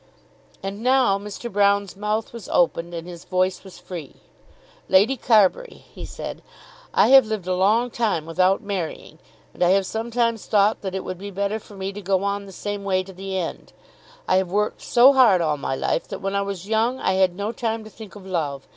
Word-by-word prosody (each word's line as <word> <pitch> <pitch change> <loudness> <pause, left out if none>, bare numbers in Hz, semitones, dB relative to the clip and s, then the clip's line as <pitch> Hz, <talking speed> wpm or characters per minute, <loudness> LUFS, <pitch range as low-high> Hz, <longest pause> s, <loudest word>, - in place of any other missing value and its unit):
And 195 +2 -5
now 250 -5 +3
Mr. 210 +3 -7
Broune's 200 -2 +1
mouth 210 +3 -2
was 230 -5 -9
opened, 170 0 +1
and 165 +1 -6
his 175 -2 -9
voice 185 0 0
was 190 -2 -12
free. 175 -5 -9 0.7
"Lady 200 +8 +4
Carbury," 225 - +2
he - - -8
said, - - -7 0.5
"I - - +4
have 265 -3 +7
lived 215 -4 -3
a 185 - 0
long 215 +7 +2
time 210 -10 -1
without 185 +4 +1
marrying, 195 -5 -5 0.3
and - - -14
I 175 - +4
have 195 - -1
sometimes 230 +1 -1
thought 210 0 +3
that 190 -1 -4
it 190 - -3
would 185 - -6
be 200 +1 -7
better 200 +2 -2
for 205 - -15
me 195 0 -4
to 205 - -7
go 190 0 0
on 200 0 -1
in - - -12
the - - -10
same 205 +2 -5
way 190 -1 0
to 190 +1 -12
the 190 +1 -5
end. 175 -3 -5 0.5
I - - +3
have 190 -1 0
worked 210 +2 -1
so 255 +3 +6
hard 240 -9 +5
all 155 -3 0
my 135 -1 -3
life 165 - -1
that - - -5
when 195 0 -3
I 200 - +1
was 195 -2 -5
young 225 +4 +1
I 190 - +1
had 185 -2 +3
no 205 +3 -3
time 225 -1 -3
to 215 - -11
think 215 -2 -12
of 200 -2 -12
love. 150 -7 -3
200 Hz, 215 wpm, -23 LUFS, 185-220 Hz, 0.7 s, have